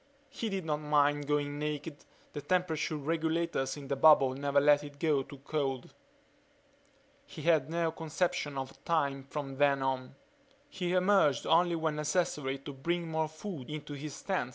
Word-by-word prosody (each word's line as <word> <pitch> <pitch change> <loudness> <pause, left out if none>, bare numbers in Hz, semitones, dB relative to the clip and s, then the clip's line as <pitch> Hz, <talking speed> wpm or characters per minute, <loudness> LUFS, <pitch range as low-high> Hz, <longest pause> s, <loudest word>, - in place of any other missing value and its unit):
He 235 -5 -4
did 190 -4 -3
not 150 -2 0
mind 145 -1 +2
going 145 0 0
naked 150 0 -4 0.4
the 145 - -5
temperature 160 0 0
regulators 160 -2 -1
in 140 -2 -8
the 140 - -1
bubble 135 -2 +6
never 140 +1 +1
let 145 +1 +5
it 145 -1 -10
get 145 -4 +1
too 140 - -9
cold. 135 -4 -2 1.3
He 155 - -9
had 160 -3 +3
no 165 0 0
conception 160 -2 -2
of 135 0 -6
time 140 -5 0
from 135 0 -6
then 140 -1 +3
on. 130 0 -2 0.5
He 180 -1 -3
emerged 185 -6 +3
only 170 +1 +4
when 160 -2 -1
necessary 150 -3 0
to 140 +1 -9
bring 170 +4 -2
more 160 0 0
food 155 -3 -8
into 150 -1 -6
his 145 +1 -7
tent. 190 -10 -1
150 Hz, 160 wpm, -31 LUFS, 140-165 Hz, 1.3 s, bubble